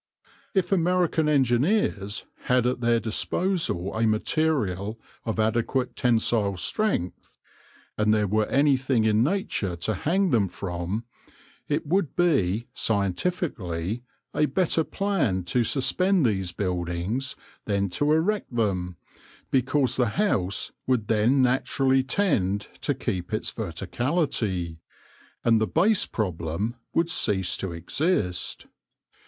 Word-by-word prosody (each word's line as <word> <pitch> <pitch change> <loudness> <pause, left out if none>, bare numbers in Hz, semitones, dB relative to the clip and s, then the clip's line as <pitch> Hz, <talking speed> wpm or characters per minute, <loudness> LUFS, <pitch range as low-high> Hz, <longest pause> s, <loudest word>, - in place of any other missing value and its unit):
If 185 -1 +1
American 175 -3 +2
engineers 130 - +1 0.2
had 125 -1 +2
at 125 0 0
their 115 -1 +3
disposal 115 - 0
a 110 +1 +2
material 110 - 0 0.3
of 110 -1 -2
adequate 120 +3 0
tensile 110 -4 +1
strength, 145 - -2 0.6
and 105 0 +3
there 105 -1 +3
were 105 +2 +1
anything 130 -4 +2
in 110 0 +3
nature 140 - -1
to 85 +6 -1
hang 175 - +1
them 105 -5 +3
from, 90 +3 -4 0.6
it 150 +3 -1
would 175 +1 0
be, 120 - +2
scientifically, 100 - -1 0.3
a 150 - +2
better 170 -3 +1
plan 155 - -1
to 120 +8 +1
suspend 180 - +3
these 95 -5 0
buildings 90 +7 -2 0.3
than 100 -1 0
to 145 +11 0
erect 165 - 0
them, 90 -6 -1 0.5
because 130 +1 +2
the 125 -2 +3
house 100 - 0 0.2
would 125 -5 0
then 115 +5 +3
naturally 130 +1 +2
tend 105 - 0
to 145 - 0
keep 95 -9 -3
its - - -2
verticality, 115 - -2 0.6
and 115 -1 +4
the 110 - +2
base 195 +6 +3
problem 90 +1 -2 0.2
would 165 - +1
cease 95 - +1
to 95 - -4
exist. 90 - -1
115 Hz, 115 wpm, -25 LUFS, 100-150 Hz, 0.6 s, and